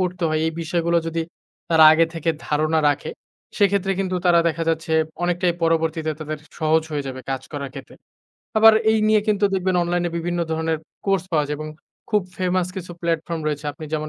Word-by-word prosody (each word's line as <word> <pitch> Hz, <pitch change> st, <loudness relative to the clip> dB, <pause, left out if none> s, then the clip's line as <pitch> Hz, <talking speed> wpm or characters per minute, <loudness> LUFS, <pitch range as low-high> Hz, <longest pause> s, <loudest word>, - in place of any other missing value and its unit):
করতে 180 Hz, 0 st, -2 dB
হয় 155 Hz, 0 st, 0 dB
এই 160 Hz, -, -1 dB
বিষয়গুলো 170 Hz, +1 st, 0 dB
যদি 165 Hz, 0 st, -1 dB, 0.5 s
তারা 160 Hz, -1 st, +7 dB
আগে 165 Hz, +1 st, +4 dB
থেকে 165 Hz, 0 st, 0 dB, 0.2 s
ধারণা 155 Hz, +2 st, +1 dB
রাখে, 145 Hz, -, -1 dB, 0.5 s
সেক্ষেত্রে 200 Hz, -2 st, +2 dB
কিন্তু 185 Hz, -1 st, -2 dB
তারা 175 Hz, -1 st, +5 dB
দেখা 165 Hz, +1 st, -3 dB
যাচ্ছে 160 Hz, 0 st, -1 dB, 0.3 s
অনেকটাই 175 Hz, 0 st, +1 dB
পরবর্তীতে 160 Hz, -1 st, +1 dB
তাদের 155 Hz, 0 st, -4 dB, 0.2 s
সহজ 160 Hz, 0 st, +2 dB
হয়ে 145 Hz, -2 st, -2 dB
যাবে 130 Hz, -1 st, -6 dB
কাজ 135 Hz, -1 st, -2 dB
করার 140 Hz, -2 st, -5 dB
ক্ষেত্রে। 135 Hz, -, -10 dB, 0.6 s
আবার 220 Hz, 0 st, +8 dB, 0.2 s
এই 220 Hz, -, +3 dB
নিয়ে 215 Hz, 0 st, +4 dB
কিন্তু 210 Hz, -1 st, +2 dB
দেখবেন 185 Hz, -1 st, 0 dB
অনলাইনে 175 Hz, 0 st, -1 dB
বিভিন্ন 175 Hz, +1 st, -2 dB
ধরনের 160 Hz, 0 st, -1 dB, 0.3 s
কোর্স 195 Hz, -2 st, +1 dB
পাওয়া 150 Hz, -2 st, +3 dB
যায় 150 Hz, +1 st, -3 dB
এবং 155 Hz, 0 st, -5 dB, 0.4 s
খুব 210 Hz, -2 st, +3 dB
ফেমাস 185 Hz, -1 st, 0 dB
কিছু 180 Hz, -1 st, -6 dB
প্লাটফর্ম 165 Hz, 0 st, -2 dB
রয়েছে। 150 Hz, -1 st, -2 dB
আপনি 155 Hz, -, -10 dB
যেমন 155 Hz, 0 st, -2 dB
165 Hz, 185 wpm, -22 LUFS, 155-180 Hz, 0.6 s, আবার